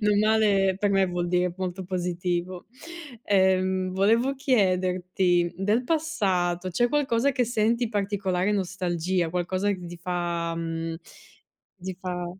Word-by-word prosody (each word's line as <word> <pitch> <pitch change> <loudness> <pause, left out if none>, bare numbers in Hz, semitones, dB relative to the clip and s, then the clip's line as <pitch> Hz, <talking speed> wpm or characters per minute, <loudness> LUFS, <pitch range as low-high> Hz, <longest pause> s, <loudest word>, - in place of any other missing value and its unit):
Non 210 -1 +2
male 205 -3 +3
per 205 -1 +1
me 195 -1 +3
vuol 175 -1 -2
dire 180 0 +1
molto 185 0 -4
positivo. 180 0 -3 0.6
Ehm, 185 -1 +2
volevo 230 +8 +2
chiederti 185 -7 +1
del 210 +5 +1
passato, 195 - 0
c'è 240 +8 +1
qualcosa 280 -2 +1
che 250 -1 +1
senti 230 +1 +1
particolare 200 -2 -1
nostalgia? 180 -2 -1
Qualcosa 185 +3 -1
che 180 -3 -4
ti 175 - -8
fa, 170 -1 -2
mhmm, 165 0 -4 0.9
ti 185 0 -4
fa 180 -1 -4
185 Hz, 125 wpm, -26 LUFS, 175-210 Hz, 0.9 s, male